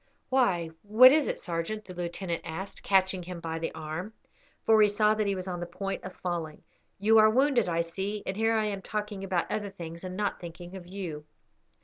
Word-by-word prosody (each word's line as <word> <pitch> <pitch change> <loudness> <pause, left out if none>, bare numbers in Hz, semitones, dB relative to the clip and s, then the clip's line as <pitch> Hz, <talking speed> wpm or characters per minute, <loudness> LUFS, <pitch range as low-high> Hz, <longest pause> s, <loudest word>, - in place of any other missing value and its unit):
"Why, 190 -11 +2
what 225 +5 +8
is 300 0 +3
it, - - -1
sergeant?" 175 +5 -3
the 185 - -9
lieutenant 175 0 -3
asked, 190 +5 -6
catching 190 -1 +2
him 175 0 -7
by 165 -1 -4
the 165 - -2
arm, 160 +7 -5 0.5
for 220 -1 +6
he 210 - +6
saw 210 +1 +3
that 215 -1 0
he 200 - +1
was 185 0 -5
on 180 -1 -3
the 175 - -4
point 195 +3 -4
of 185 - -8
falling. 170 -4 -4 0.3
"You 220 +3 +5
are 215 0 +7
wounded, 250 -3 +3
I 170 0 +1
see; 195 +5 -4
and 190 - -2
here 225 +1 +2
am 210 -2 0
I - - -14
talking 210 -1 -4
about 185 -3 -1
other 205 -1 -2
things 170 -3 -8
and 185 0 -5
not 205 -1 -1
thinking 175 +1 -9
of 180 -2 -9
you." 175 -6 -6
190 Hz, 215 wpm, -29 LUFS, 175-210 Hz, 0.5 s, what